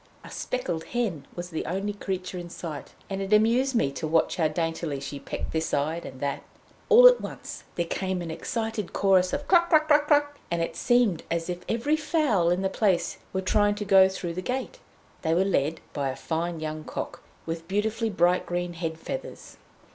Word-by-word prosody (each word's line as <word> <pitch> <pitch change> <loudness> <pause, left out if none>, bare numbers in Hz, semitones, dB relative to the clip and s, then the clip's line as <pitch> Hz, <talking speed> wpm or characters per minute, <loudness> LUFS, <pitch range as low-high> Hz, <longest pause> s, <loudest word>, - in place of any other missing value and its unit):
A - - -11
speckled 175 -10 -3
hen 220 - -2
was 175 +1 -6
the 160 - -2
only 195 +4 -2
creature 185 -2 -4
in 175 0 -7
sight, 160 -4 -7
and 195 0 -3
it 195 +1 -4
amused 235 +5 +4
me 140 -11 +2
to 140 +3 -4
watch 160 +1 +2
how 160 -3 +3
daintily 165 -2 -2
she 140 +1 -6
pecked - - -5
this 160 0 -1
side 155 +4 -1
and 130 - -10
that. 140 0 -2 0.5
All - - +9
at - - +5
once - - -8
there 170 - 0
came 185 +2 -2
an 165 - -5
excited 220 +3 -3
chorus 190 -2 +3
of 285 0 -3
"Cluck 345 -2 +5
Cluck 310 -1 +4 0.2
Cluck!" 290 -1 +2
and 170 -1 -1
it 165 0 -2
seemed 230 -4 +2
as 170 +1 -1
if 175 - -4
every 240 +7 +1
fowl 295 - +2
in 180 +2 +1
the - - +3
place 190 -2 0
were 190 - -1
trying 205 +2 +2
to 205 0 -4
go 190 -1 +7
through 180 -3 -4
the 185 - -4
gate. 260 - -3 0.4
They 160 -1 +1
were 185 +3 +3
led 160 -4 0
by 140 -2 -1
a 130 - -4
fine 165 +4 -3
young 155 0 -4
cock, - - -6 0.2
with 165 0 -5
beautifully 220 +3 0
bright 180 -2 +2
green 175 0 -2
head 165 -1 -4
feathers. 270 +10 -7
185 Hz, 200 wpm, -27 LUFS, 165-220 Hz, 0.5 s, All